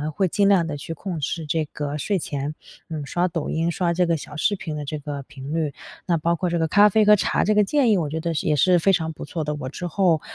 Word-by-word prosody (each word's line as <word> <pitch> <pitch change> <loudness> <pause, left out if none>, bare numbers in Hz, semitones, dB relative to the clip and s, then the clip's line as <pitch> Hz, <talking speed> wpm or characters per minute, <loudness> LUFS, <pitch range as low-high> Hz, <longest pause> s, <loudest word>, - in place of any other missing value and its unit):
会 190 - +2
尽 200 +3 +2
量 185 -4 +4
地 150 -2 -4
去 155 +3 -6
控 170 +1 -5
制 155 +3 -3
这 155 +1 0
个 145 0 -4
睡 200 +6 0
前， 145 -1 -4 0.4
嗯， 155 -3 -4
刷 175 +5 0
抖 165 -4 -3
音、 165 +1 0
刷 170 0 0
这 180 +1 +2
个 170 -1 +1
小 150 0 -10
视 205 +6 +1
频 160 -5 -5
的 150 - -4
这 150 +1 -4
个 145 -1 -6
频 140 +1 -8
率， 155 -4 -1 0.3
那 170 -2 +2
包 170 +2 +1
括 180 +1 -1
这 170 - 0
个 160 - +1
咖 205 +5 +6
啡 215 +1 +3
和 210 0 +8
茶 200 - +1
这 215 - +3
个 210 - +5
建 265 +4 +2
议 205 - +4
我 155 -4 -1
觉 160 +2 -3
得 170 +1 -2
也 155 - +1
是 180 +6 +4
非 195 +4 +3
常 160 -3 0
不 - - -9
错 160 +2 -4
的， 150 0 -2
我 130 -3 -5
之 175 +5 -5
后， 175 -3 +2
165 Hz, 300 characters per minute, -23 LUFS, 150-185 Hz, 0.4 s, 和